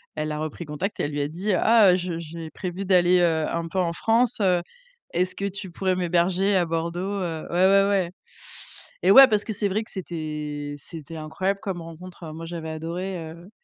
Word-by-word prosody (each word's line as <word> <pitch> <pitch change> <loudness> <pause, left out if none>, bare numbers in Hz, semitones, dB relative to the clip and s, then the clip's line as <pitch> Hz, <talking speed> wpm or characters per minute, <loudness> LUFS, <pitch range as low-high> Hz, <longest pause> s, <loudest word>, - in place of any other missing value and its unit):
elle 155 0 -2
a 150 - -3
repris 155 +2 -5
contact 155 +7 -4
et - - 0
elle 145 - -2
lui 145 0 -2
a 145 - 0
dit: 185 +6 -2
«Ah, 215 0 +6
heu, - - +4
je 175 -2 -3
j'ai 165 0 -7
prévu 185 +1 -5
d'aller, 180 -1 +4
heu, 160 -3 +2
un 170 0 -2
peu 190 +3 -2
en 170 -2 +1
France, 230 +5 +1 0.7
est-ce 180 +2 0
que 200 - -3
tu 195 -2 -5
pourrais 185 +1 0
m'héberger 180 +3 +1
à 180 - +3
Bordeaux?», 165 +1 -2 0.2
heu, 165 -2 -3
ouais, 180 +2 +3
ouais, 195 +1 +5
ouais. 190 -4 +1 0.9
Eh - - +5
ouais, 270 0 +10
parce 210 -3 +1
que 220 - -3
c'est 205 0 0
vrai 215 +4 -1
que - - -12
c'était 150 -5 -5
c'était 160 +2 -9
incroyable 190 +6 -2
comme 185 -4 -4
rencontre. 165 0 -10
Moi, 165 +1 -7
j'avais 165 -1 -6
adoré, 165 +1 -5
heu, 170 +4 -13
175 Hz, 205 wpm, -25 LUFS, 160-190 Hz, 0.9 s, ouais